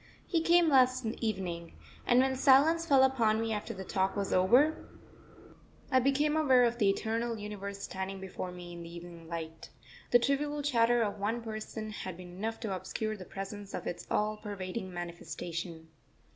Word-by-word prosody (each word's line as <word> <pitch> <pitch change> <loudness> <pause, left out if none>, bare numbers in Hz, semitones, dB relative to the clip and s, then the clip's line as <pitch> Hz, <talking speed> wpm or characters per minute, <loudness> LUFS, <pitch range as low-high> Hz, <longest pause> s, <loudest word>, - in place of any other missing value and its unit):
He 335 -3 +1
came 340 +1 +5
last 255 -3 +4
evening; 190 -7 -3 0.3
and 245 +1 +6
when 265 0 +1
silence 290 +5 +5
fell 275 -3 +6
upon 230 -5 +3
me 225 0 -1
after 210 +2 -4
the 190 -3 -6
talk 190 0 0
was 200 -1 -1
over, 250 +12 +4 1.0
I 260 - +5
became 280 +4 +2
aware 265 -5 +5
of 240 0 +1
the 205 -3 +4
eternal 230 +3 -1
universe 200 -1 -6
standing 190 +1 -4
before 185 -1 -6
me 175 -1 -9
in 170 - -8
the 170 0 -9
evening 170 -1 -10
light. 160 -1 -6 0.4
The 245 - +7
trivial 285 +4 0
chatter 240 -4 +3
of 205 -1 -3
one 215 +4 -1
person 215 0 -5
had 185 -4 -6
been 180 -1 -10
enough 225 +3 -3
to 210 -5 -2
obscure 215 +4 -3
the 190 -3 -9
presence 195 +1 -7
of - - -5
its - - -5
all 210 0 0
pervading 195 -1 -5
manifestation. 170 -1 -6
215 Hz, 170 wpm, -31 LUFS, 185-255 Hz, 1.0 s, The